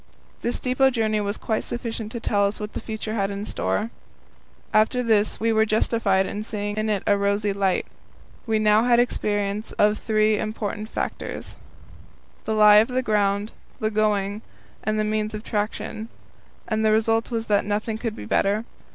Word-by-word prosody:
This 240 - -1
depot 260 +1 +3
journey 220 -4 0
was 205 +1 -2
quite 220 -1 -2
sufficient 230 -2 -5
to 235 - -4
tell 205 -2 +2
us 200 - -4
what 210 0 -6
the - - -3
future 220 -1 -5
had 195 -3 0
in 200 +1 -4
store. 215 +1 -1 0.8
After 220 +4 +3
this 215 -3 +2
we 225 0 +2
were 220 0 +4
justified 215 -3 +2
in 205 - -4
seeing 205 -1 -3
it - - -2
in 205 -3 0
a 205 - +4
rosy 200 0 0
light. 195 -2 +1 0.6
We 220 -1 +2
now 215 +1 +4
had 240 -1 +5
experience 205 -3 -1
of 210 0 +4
the - - -9
three 215 -1 +2
important 215 0 -4
factors - - -4 0.9
the 220 - -1
lie 210 -1 +8
of 215 +2 +6
the 255 0 -1
ground, 205 -1 +1 0.3
the 215 -2 0
going, 210 -1 0 0.4
and 215 0 0
the 215 - +1
means 215 0 -1
of 215 - -6
traction 215 +1 -3 0.6
and 220 0 0
the 215 - +4
result 225 +1 +2
was 230 -2 -2
that 205 -2 +2
nothing 215 +2 -2
could 225 -2 -3
be - - -8
better. 205 - +1
215 Hz, 180 wpm, -24 LUFS, 205-225 Hz, 0.9 s, lie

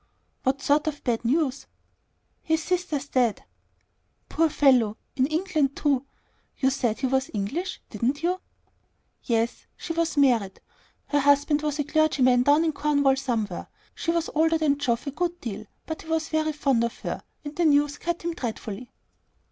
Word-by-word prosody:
"What 270 +1 0
sort 295 +2 +2
of 295 -2 -3
bad 235 -3 0
news?" 275 +2 0 0.7
"His 320 0 0
sister's 320 -6 -1
dead." 245 -6 +1 0.8
"Poor 325 0 +2
fellow! 250 -8 +3 0.2
In 260 0 +2
England 310 -4 0
too! 280 -2 0 0.5
You 265 -1 +2
said 240 -5 -1
he - - +1
was 265 +1 +1
English, 275 - -3
didn't 250 +8 -1
you?" 360 +2 0 0.8
"Yes. 230 -1 -1
She 330 - -4
was 335 -2 -1
married. 235 -9 +3 0.5
Her 290 - +2
husband 285 +1 +3
was 300 -1 -1
a 295 - 0
clergyman 275 -5 +3
down 290 +5 +4
in 315 - +1
Cornwall 285 -2 +2
somewhere. 230 -8 -2 0.3
She - - -4
was 335 0 0
older 325 +1 +3
than 290 -3 +1
Geoff 240 -4 0
a 280 - -3
good 345 +4 -2
deal; 215 - -6 0.2
but 320 - -5
he - - -14
was 320 -1 0
very 310 0 0
fond 275 -5 +1
of 235 - -2
her, - - -4 0.2
and 290 +1 -6
the 345 - +1
news 290 -1 +3
cut 340 0 -3
him 340 - -1
up 335 - -10
dreadfully." 225 -1 -5
285 Hz, 170 wpm, -26 LUFS, 250-315 Hz, 0.8 s, down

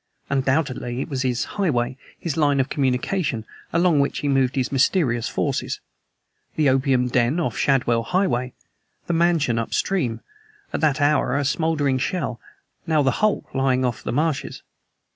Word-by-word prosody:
Undoubtedly 130 -2 0
it 135 - -4
was 135 -3 -2
his 125 -2 0
highway, 130 -11 -1 0.2
his 165 -5 -3
line 145 -3 +2
of 130 - +1
communication, 130 - -1 0.3
along 170 -2 +3
which 140 - +1
he 145 - -2
moved 135 -2 +2
his 130 -2 -1
mysterious 135 - +2
forces. - - -2 0.8
The 150 -3 +3
opium 130 -1 +2
den 125 +5 +1
off 170 - -1
Shadwell 125 -4 +2
Highway, 130 -5 0 0.5
the 175 - -1
mansion 165 -8 +2
upstream, 115 -1 -1 0.5
at - - -1
that 155 -2 +2
hour 145 -3 +2
a 145 - 0
smoldering 145 -3 +1
shell; 135 - -2 0.5
now 155 -2 +3
the 135 - +3
hulk 215 -1 0
lying 130 -1 +1
off 120 -3 -2
the - - -4
marshes. 150 +2 -1
135 Hz, 150 wpm, -23 LUFS, 125-155 Hz, 0.8 s, along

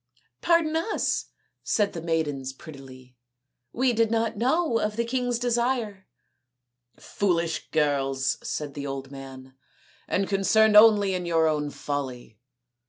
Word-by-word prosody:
" 125 - -43
Pardon 335 -2 +2
us," 370 +7 -1 0.4
said 205 -2 0
the 165 - -6
maidens 150 -5 -2
prettily, 130 -4 -13 0.3
" 125 -1 -56
we 250 0 +1
did 230 -1 +2
not 230 0 0
know 255 +2 +1
of 210 -1 -2
the 235 +1 -1
king's 245 0 -1
desire." 235 -4 -1 0.5
" 125 0 -57 0.2
Foolish 170 -4 -2
girls," 135 -3 0
said 150 -2 -5
the 145 0 -5
old 135 0 -6
man, 135 -1 -11 0.3
" - - -31
and 195 0 0
con 195 -1 0
cerned 220 +2 +4
only 210 -2 +6
in 180 -1 -3
your 165 -1 +2
own 150 -1 -1
folly. 130 -7 -6
170 Hz, 150 wpm, -25 LUFS, 135-225 Hz, 0.5 s, only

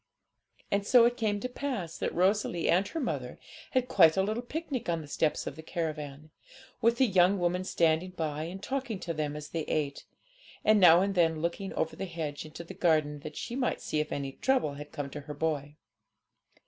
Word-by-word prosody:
And 200 0 +2
so 235 +3 +6
it 240 0 +2
came 215 -4 0
to - - -1
pass 250 - -4
that - - -1
Rosalie 185 -1 +1
and 185 +3 +3
her 330 - -4
mother 265 - -3 0.4
had 255 -2 +2
quite 165 -7 +5
a 190 - +4
little 215 +4 -1
picnic 275 - -4
on 165 -1 0
the 150 - -10
steps 150 +1 0
of - - -5
the 160 - -9
caravan; 155 -3 -5 0.5
with 230 +1 +3
the 265 - +5
young 190 -2 +4
woman 180 0 0
standing 170 -1 +2
by, 155 -4 -3
and 190 +4 -7
talking 260 -6 -3
to 170 - -3
them 150 -2 -2
as 150 0 -7
they 165 - -2
ate, 145 -3 -2 0.6
and 215 0 +6
now 175 -2 +8
and 200 +1 +1
then 165 -3 +2
looking 190 +3 -2
over 160 - -1
the 195 - -4
hedge 160 -5 -5
into 155 +2 -8
the 170 - -9
garden, 155 -5 +2
that 150 +1 -8
she 235 - -4
might 255 -1 0
see 155 - -2
if 150 - -2
any 140 -1 -3
trouble 255 - +1
had 145 +1 -9
come 140 -1 -5
to 150 - -6
her 150 +1 -8
boy. 145 -2 -2
170 Hz, 210 wpm, -30 LUFS, 155-205 Hz, 0.6 s, now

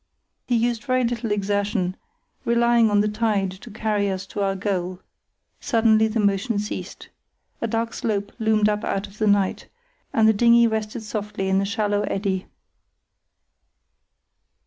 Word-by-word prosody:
He 245 - +2
used 235 +1 0
very 255 -1 +2
little 230 -2 -2
exertion, 200 -2 0 0.5
relying 235 -1 +3
on 205 0 +3
the 210 - +1
tide 210 -3 0
to 195 +6 -11
carry 210 -1 -1
us 190 0 -3
to 200 +1 -5
our 195 -1 +1
goal. 185 -2 -2 0.6
Suddenly 220 -1 +3
the 220 +1 -2
motion 205 +3 +1
ceased. 210 +1 -5 0.5
A 230 - 0
dark 230 +1 -2
slope 205 -2 -2
loomed 220 -1 +3
up 210 0 0
out 195 +1 -1
of 205 +1 -16
the 215 - +2
night, 200 -2 +1 0.4
and 220 -1 +4
the 220 - +6
dinghy 235 +2 +5
rested 220 0 -2
softly 210 -2 -3
in 190 0 +3
a - - 0
shallow 205 0 0
eddy. 195 -1 -2
210 Hz, 150 wpm, -23 LUFS, 200-225 Hz, 0.6 s, the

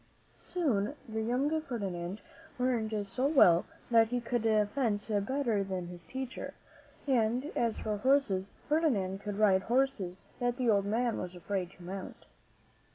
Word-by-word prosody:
Soon 270 - -1
the 220 0 -3
young 270 +8 +1
Fer 255 -6 -4
dinand 185 -1 -4 0.4
learned 225 -5 0
so 250 +7 0
well 180 - +6 0.3
that 225 -1 +6
he 245 +2 -1
could 240 0 -1 0.3
fence 225 -6 0
better 220 +1 +1
than 185 -2 -4
his 175 -2 -10
teacher, 260 -1 -6 0.5
and 250 +1 +1
as 230 -2 +1
for 210 -1 -2
horses, 205 -6 +2 0.2
Ferdinand 235 - +1
could 205 -1 -4
ride 200 -3 +4
horses 235 -6 0 0.2
that 245 0 0
the 245 -3 +3
old 200 -1 +3
man 230 +3 0
was 180 0 -5
afraid 180 0 -3
to 180 - -15
mount. 190 +2 -7
220 Hz, 150 wpm, -31 LUFS, 195-255 Hz, 0.5 s, well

